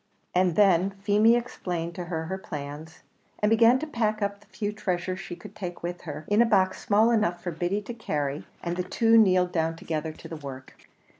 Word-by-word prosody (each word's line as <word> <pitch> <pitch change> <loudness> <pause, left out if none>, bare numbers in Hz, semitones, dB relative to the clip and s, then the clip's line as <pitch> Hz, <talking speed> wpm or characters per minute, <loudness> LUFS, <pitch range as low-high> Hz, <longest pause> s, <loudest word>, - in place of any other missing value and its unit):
And 180 -2 +2
then 190 -2 +4
Feemy 210 +3 +5
explained 175 -8 -3
to 180 -1 -5
her 165 -2 -3
her 190 +3 -4
plans, 155 0 -8 0.3
and 210 +1 +1
began 230 +2 +6
to 300 - -4
pack 220 -7 -1
up 200 0 -2
the 205 - -23
few 205 -2 -3
treasures 185 -3 -2
she 195 -2 -7
could - - -12
take 175 -4 -6
with 175 +1 -4
her, 150 +1 -6
in 205 +2 +4
a - - +6
box 190 -4 +2
small 220 +3 +4
enough 210 -7 +1
for 175 - -2
Biddy 175 +5 -2
to 240 - -6
carry; 145 -10 -3 0.2
and 175 0 -2
the 180 - 0
two 225 +5 +3
kneeled 185 -5 +5
down 165 -1 0
together 160 -1 -3
to 155 - -12
the 165 0 -7
work. 135 -3 -10
185 Hz, 210 wpm, -27 LUFS, 165-210 Hz, 0.3 s, began